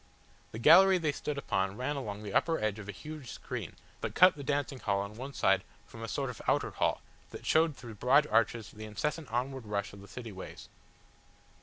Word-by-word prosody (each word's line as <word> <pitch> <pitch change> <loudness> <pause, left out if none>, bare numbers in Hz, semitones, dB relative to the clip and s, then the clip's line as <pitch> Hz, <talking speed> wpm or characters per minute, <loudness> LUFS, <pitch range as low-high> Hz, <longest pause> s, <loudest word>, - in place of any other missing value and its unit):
The - - -6
gallery 185 +10 +7
they 160 -4 0
stood 145 0 -4
upon 95 -6 -1
ran 130 +4 -2
along 105 -6 -5
the 100 -2 -6
upper 165 -1 +2
edge 110 -1 -1
of 105 -1 -8
a - - -1
huge 150 +6 -9
screen - - -6 0.3
that - - -4
cut 185 0 +7
the 145 - -8
dancing 140 -1 -1
hall 100 -4 0
on 100 +1 -5
one 130 +4 -6
side 95 -5 +3 0.2
from 115 - -12
a 115 - -4
sort 135 +1 -2
of 125 - -11
outer - - +2
hall - - 0 0.3
that - - -10
showed 160 -2 +3
through 120 -2 -9
broad 140 +4 +5
arches 115 -3 +1
the 110 0 -9
incessant 130 +8 -3
onward 125 0 -2
rush 100 -1 -2
of 100 - -11
the 100 - -12
city 115 -1 -8
ways. 95 -1 -9
120 Hz, 210 wpm, -31 LUFS, 105-145 Hz, 0.3 s, gallery